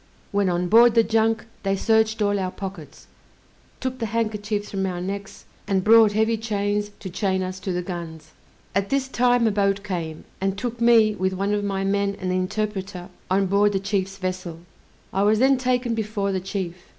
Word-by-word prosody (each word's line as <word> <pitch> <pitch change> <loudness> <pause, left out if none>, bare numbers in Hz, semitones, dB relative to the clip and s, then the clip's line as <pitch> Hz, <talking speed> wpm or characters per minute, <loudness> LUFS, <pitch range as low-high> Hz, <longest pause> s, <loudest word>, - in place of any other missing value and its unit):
When 200 -2 +1
on 175 0 0
board 230 +4 +6
the 230 - +6
junk, 225 0 +1 0.2
they 195 0 0
searched 220 +1 +2
all 205 0 +1
our 185 -1 -1
pockets, 185 -5 -8 0.7
took 260 0 -4
the 225 - -2
handkerchiefs 210 -1 -2
from 195 -1 -1
our 180 -1 -3
necks, 195 +2 -6 0.2
and 190 -2 +1
brought 220 0 +6
heavy 220 +2 +2
chains 205 -1 -1
to 190 - -6
chain 190 0 0
us 185 0 -5
to 190 - -4
the 180 0 -2
guns. 160 -3 -7 0.4
At 195 +1 0
this 275 -1 0
time 245 -2 +2
a 220 - +3
boat 200 -1 +1
came, 170 -6 -4 0.2
and 195 0 -1
took 235 +2 -4
me, 230 -2 +5
with 190 -2 -1
one 195 +2 -1
of 205 0 0
my 195 -1 -1
men 200 0 0
and 185 -1 -2
the - - 0
interpreter, 195 -1 -3 0.2
on 195 +1 +2
board 200 +2 +3
the 195 - +1
chief's 195 -1 -2
vessel. 185 -3 -4 0.5
I 195 - +1
was 210 +2 +4
then 265 +2 +4
taken 250 -2 0
before 210 -3 -2
the 190 - -1
chief. 185 -2 -5
200 Hz, 195 wpm, -23 LUFS, 190-220 Hz, 0.7 s, board